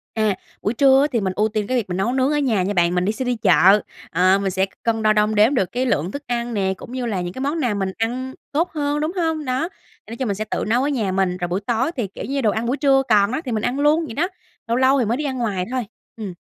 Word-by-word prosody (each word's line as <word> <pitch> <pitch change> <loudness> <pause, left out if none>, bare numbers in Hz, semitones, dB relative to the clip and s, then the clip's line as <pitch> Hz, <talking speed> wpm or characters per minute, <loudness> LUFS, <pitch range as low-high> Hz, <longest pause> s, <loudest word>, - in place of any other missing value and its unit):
À, 215 -3 +1 0.3
buổi 210 - -1
trưa 270 +1 +5
á, 290 - +3
thì 230 -4 0
mình 190 -1 -1
ưu 215 - +2
tiên 210 -1 -2
cái 255 - 0
việc 210 -6 -2
mà 180 - -2
nấu 195 +6 0
nướng 265 +2 +2
ở 295 - +1
nhà 230 -10 +1
nha 200 +2 -1
bạn, 175 -1 +2
mình 180 +1 +1
đi 210 - +2
sẽ 255 +4 -4
đi 245 -1 0
chợ, 195 -1 +5 0.3
ờ, 185 +3 +4
mình 195 -1 -1
sẽ 190 +1 +1 0.2
cân 225 -1 0
đo 215 0 +4
đong 210 0 +2
đếm 215 +7 +5
được 190 - 0
cái 255 +1 -1
lượng 175 - 0
thức 285 +4 -6
ăn 240 -1 -2
nè, 190 -2 0
cũng 240 - -11
như 255 -1 -3
là 200 -6 -1
những 175 0 -5
cái - - -8
món 290 +4 -1
nào 245 -7 0
mình 195 -1 -1
ăn 250 +4 -2 0.2
tốt 330 +5 0
hơn, 295 -1 -1
đúng 310 +2 -1
hông? 320 -4 -1
Đó, 260 +7 -1
thì 220 - -21
nói 230 - -5
chung 260 - -2
mình 200 - -1
sẽ 215 +2 -4
tự - - -1
nấu 245 +4 +2
ở 285 - +1
nhà 225 -9 -1
mình, 185 -1 0
rồi 175 - -2
buổi 180 +3 -1
tối 240 +7 0
thì, 230 -6 -2
kiểu 195 - -9
như, 275 0 -2
đồ 215 -3 +3
ăn 220 +2 -2
buổi 260 +4 0
trưa 270 -2 +4
còn 205 0 +4
đó 310 - -2
thì 250 - -3
mình 215 -1 -1
ăn 255 +3 -1
luôn 305 +3 +3
vậy 225 - -7
đó, 340 +5 +1 0.4
lâu 235 +1 +1
lâu 265 +1 +4
thì 240 - +2
mới 235 +4 0
đi 300 - -3
ăn 265 -2 -2
ngoài 200 -6 -1
thôi. 255 -1 -1 0.3
Ừm. 205 -5 -5
230 Hz, 315 wpm, -21 LUFS, 200-265 Hz, 0.4 s, trưa